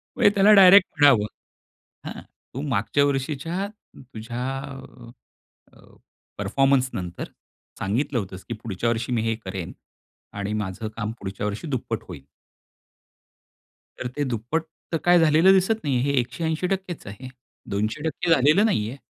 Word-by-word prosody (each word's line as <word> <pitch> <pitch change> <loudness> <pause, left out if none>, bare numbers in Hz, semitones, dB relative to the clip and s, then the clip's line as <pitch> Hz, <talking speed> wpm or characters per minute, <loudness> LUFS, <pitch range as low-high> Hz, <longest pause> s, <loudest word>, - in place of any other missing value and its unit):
म्हणजे - - +5
त्याला 200 +2 +6
डायरेक्ट 195 -1 +8
म्हणावं. 135 -8 +6 0.8
"हां, - - -7 0.3
तू 135 - -4
मागच्या 130 +6 +1
वर्षीच्या 150 +7 -2 0.3
तुझ्या 120 -1 -7 0.2
अ, 130 -3 -12 0.4
अ, - - -19 0.6
परफॉर्मन्सनंतर. 125 -4 0 0.5
सांगितलं 120 +6 -1
होतस 95 -2 -7
की - - -2
पुढच्या 115 +2 -2
वर्षी 115 +1 -2
मी 115 - +1
हे 115 0 0
करेन. 95 -2 -5 0.6
आणि 100 +1 -3
माझं 100 +3 -5
काम 110 -1 -2
पुढच्या 95 +1 -5
वर्षी 105 +10 -5
दुप्पट 115 -4 -3
होईल." 80 -7 -9 1.7
तर 125 - -4
ते 145 +4 -3
दुप्पट 125 +6 -2 0.3
तर 165 - +1
काय 175 0 +6
झालेलं 160 +4 +5
दिसत 195 +3 +2
नाहीये 130 -4 +1
हे 140 - +1
180%च 165 +8 -3
आहे. 125 +6 -8 0.4
200% 150 - -2
झालेलं 155 - +4
नाहीये. 120 - -1
130 Hz, 130 wpm, -24 LUFS, 110-160 Hz, 1.7 s, डायरेक्ट